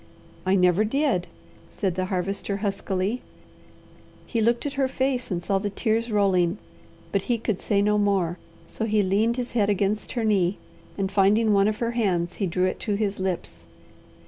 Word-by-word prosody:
"I 190 Hz, -, +4 dB
never 180 Hz, +2 st, +4 dB
did," 225 Hz, -6 st, 0 dB, 0.4 s
said 190 Hz, -4 st, -2 dB
the 185 Hz, +1 st, -1 dB
Harvester 195 Hz, +2 st, -2 dB
huskily. 195 Hz, +3 st, -1 dB, 1.0 s
He 230 Hz, -, -1 dB
looked 235 Hz, +4 st, +2 dB
at 285 Hz, -, -2 dB
her 275 Hz, -1 st, +1 dB
face 260 Hz, -1 st, -1 dB
and 175 Hz, -3 st, -2 dB
saw 195 Hz, -1 st, +1 dB
the 205 Hz, +1 st, -2 dB
tears 225 Hz, +2 st, -1 dB
rolling, 190 Hz, -3 st, +2 dB, 0.5 s
but 200 Hz, -, +1 dB
he 240 Hz, -, +3 dB
could 220 Hz, -3 st, -2 dB
say 200 Hz, -2 st, +1 dB
no 210 Hz, 0 st, +2 dB
more, 190 Hz, -4 st, +1 dB, 0.3 s
so 220 Hz, -, -3 dB
he 215 Hz, -1 st, +2 dB
leaned 215 Hz, +5 st, +1 dB
his 250 Hz, -1 st, -3 dB
head 210 Hz, -4 st, +2 dB
against 205 Hz, +1 st, 0 dB
her 235 Hz, -, -1 dB
knee, 200 Hz, -4 st, +2 dB, 0.4 s
and 195 Hz, -1 st, -1 dB
finding 210 Hz, +2 st, +4 dB
one 200 Hz, 0 st, +4 dB
of 215 Hz, 0 st, 0 dB
her 235 Hz, 0 st, -1 dB
hands 185 Hz, -7 st, 0 dB
he 200 Hz, -, 0 dB
drew 180 Hz, +2 st, +1 dB
it 185 Hz, -, -2 dB
to 210 Hz, -3 st, -1 dB
his 205 Hz, -1 st, -1 dB
lips. 175 Hz, -, -4 dB
200 Hz, 180 wpm, -25 LUFS, 190-225 Hz, 1.0 s, I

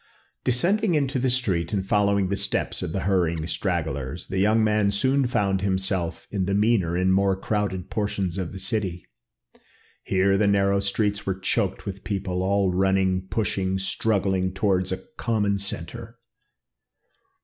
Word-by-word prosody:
Descending 180 Hz, -, +1 dB
into 140 Hz, -2 st, 0 dB
the 130 Hz, +1 st, +1 dB
street 100 Hz, -9 st, 0 dB
and 95 Hz, -2 st, 0 dB
following 100 Hz, -1 st, +2 dB
the 100 Hz, -, 0 dB
steps 100 Hz, +1 st, -2 dB
of -, -, -3 dB
the 95 Hz, -, -2 dB
hurrying 85 Hz, -5 st, +1 dB
stragglers, 80 Hz, -4 st, -2 dB
the 95 Hz, -, -1 dB
young 110 Hz, +3 st, +3 dB
man 105 Hz, -1 st, +2 dB
soon 130 Hz, +6 st, +2 dB
found 100 Hz, -5 st, 0 dB
himself 95 Hz, -3 st, -1 dB
in 95 Hz, -3 st, -1 dB
the 100 Hz, +1 st, 0 dB
meaner 100 Hz, -5 st, +2 dB
and 95 Hz, +1 st, +2 dB
more 95 Hz, 0 st, +3 dB
crowded 100 Hz, -3 st, -2 dB
portions 100 Hz, -4 st, -2 dB
of 90 Hz, -3 st, -3 dB
the -, -, -7 dB
city. 95 Hz, -2 st, -2 dB, 1.0 s
Here 95 Hz, +1 st, +2 dB
the 105 Hz, -, +3 dB
narrow 100 Hz, 0 st, +3 dB
streets 100 Hz, +1 st, -1 dB
were 95 Hz, -1 st, 0 dB
choked 95 Hz, 0 st, -1 dB
with 100 Hz, -1 st, -6 dB
people, 95 Hz, -3 st, -2 dB
all 95 Hz, 0 st, +1 dB
running, 95 Hz, 0 st, +1 dB
pushing, 95 Hz, -3 st, -1 dB
struggling 95 Hz, -1 st, 0 dB
towards 95 Hz, -2 st, +1 dB
a -, -, -4 dB
common 105 Hz, -4 st, 0 dB
centre. 100 Hz, 0 st, -6 dB
100 Hz, 150 wpm, -25 LUFS, 95-105 Hz, 1.0 s, young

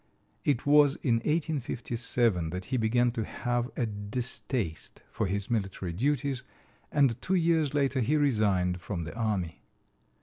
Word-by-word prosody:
It 140 Hz, -5 st, +1 dB
was 145 Hz, -1 st, +6 dB
in 120 Hz, -5 st, +3 dB
1857 120 Hz, -, 0 dB
that 90 Hz, +2 st, -5 dB
he 130 Hz, -, -1 dB
began 120 Hz, +2 st, +2 dB
to 115 Hz, -2 st, -2 dB
have 120 Hz, +2 st, -2 dB
a 120 Hz, -, +1 dB
distaste 105 Hz, -, -3 dB
for 110 Hz, -, -1 dB
his 100 Hz, +3 st, -2 dB
military 95 Hz, -5 st, -2 dB
duties, 140 Hz, -, 0 dB, 0.5 s
and 135 Hz, -5 st, +2 dB
two 190 Hz, -, 0 dB
years 165 Hz, -4 st, +2 dB
later 140 Hz, -2 st, +2 dB
he 130 Hz, +6 st, +2 dB
resigned 100 Hz, -10 st, +2 dB
from 90 Hz, -3 st, -4 dB
the 80 Hz, +4 st, -7 dB
army. 105 Hz, -8 st, -2 dB
120 Hz, 140 wpm, -29 LUFS, 100-140 Hz, 0.5 s, was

